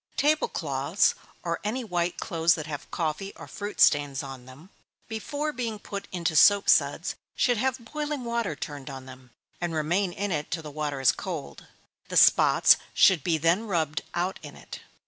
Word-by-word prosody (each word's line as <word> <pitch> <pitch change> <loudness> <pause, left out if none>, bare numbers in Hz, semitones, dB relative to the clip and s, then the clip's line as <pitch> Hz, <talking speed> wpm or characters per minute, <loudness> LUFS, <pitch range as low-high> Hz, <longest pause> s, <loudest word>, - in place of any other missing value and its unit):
_ - - -33
Table 305 +9 +2
cloths, - - +1 0.3
or 170 -1 -2
any 235 +5 -2
white 175 -4 -2
clothes 165 +1 +2
that 155 -3 -5
have 150 -2 -7
coffee 170 +4 -3
or - - -11
fruit 205 0 -7
stains 145 -2 +3
on 135 -2 -9
them, 150 +9 -15 0.4
before 285 +7 -3
being 235 -3 -3
put 200 -1 -7
into 170 -3 -2
soap 200 +6 +6
suds, - - +3 0.2
should 245 -2 +2
have 260 +1 -1
boiling 300 -3 -3
water 235 -8 -2
turned 145 -1 -7
on 135 -1 -8
them, 130 -1 -13 0.3
and 170 -2 -2
remain 175 +5 0
in 200 +2 -3
it 150 -3 -2
till 165 -2 -3
the 150 - -8
water 145 -2 -3
is 130 - +5
cold - - -7 0.4
the - - -2
spots - - +6 0.2
should 180 -7 +5
be 165 -2 +1
then 170 +8 +1
rubbed 160 -6 -1
out 180 +2 -1
in - - -10
it. - - -10
175 Hz, 185 wpm, -27 LUFS, 150-215 Hz, 0.4 s, soap